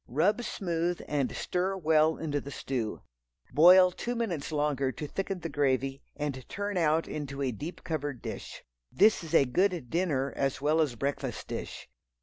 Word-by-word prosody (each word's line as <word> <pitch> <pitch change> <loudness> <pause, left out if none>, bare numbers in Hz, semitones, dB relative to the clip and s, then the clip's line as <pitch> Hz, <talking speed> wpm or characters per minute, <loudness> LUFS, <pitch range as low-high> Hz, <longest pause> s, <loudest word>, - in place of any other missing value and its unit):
Rub 180 - +2
smooth 175 -5 -2
and 140 -3 0
stir 185 +2 -1
well 160 -2 +3
into 145 -3 -2
the 140 - -8
stew. 125 -5 -3 0.5
Boil 180 +5 +8
two 240 +6 -4
minutes 180 -12 -2
longer 145 -3 0
to 150 - -6
thicken 195 +4 -4
the 165 - -3
gravy 135 -2 0
and 145 -3 -3
turn 205 0 -3
out 165 -2 +2
into 140 -2 -4
a 130 - 0
deep 150 - -7
covered 145 -6 -3
dish. - - -7 0.3
This 210 -1 +4
is 165 0 -3
a 140 - +6
good 170 0 0
dinner, 150 -6 0
as 135 -1 0
well 150 +3 +2
as 145 -6 0
breakfast 140 +4 -3
dish. - - -6
155 Hz, 165 wpm, -29 LUFS, 140-180 Hz, 0.5 s, Boil